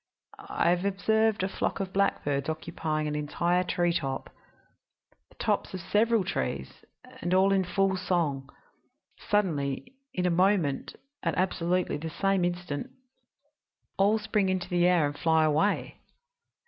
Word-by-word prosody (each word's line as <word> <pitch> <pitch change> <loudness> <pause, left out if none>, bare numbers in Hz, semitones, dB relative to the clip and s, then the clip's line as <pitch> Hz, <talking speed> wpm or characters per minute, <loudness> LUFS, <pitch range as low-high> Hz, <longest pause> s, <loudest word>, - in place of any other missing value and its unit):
I 170 - +2
have 180 +1 +1
observed 220 +1 +1
a - - +1
flock 190 - -2
of 190 -1 -4
blackbirds 145 -8 0
occupying 155 -1 -2
an 150 - -2
entire 170 +4 0
treetop 170 -6 -1 1.0
the - - -22
tops - - -1
of - - -4
several 220 +4 +2
trees 65 - -4 0.4
and 175 +2 +1
all 190 +1 +4
in 195 -1 +3
full 190 +1 +1
song. 160 -7 -1 0.8
Suddenly 150 - 0 0.2
in 180 - -2
a 180 - +3
moment 180 -5 +1 0.3
at - - -1
absolutely 180 -2 0
the 160 +2 -5
same 195 +2 +1
instant 175 - -3 1.1
all 205 +3 +3
spring 210 -2 0
into 185 -1 -1
the 175 -1 +3
air 175 -4 +4
and 145 0 -4
fly 160 -1 +3
away. 155 +7 +1
180 Hz, 135 wpm, -28 LUFS, 155-195 Hz, 1.1 s, all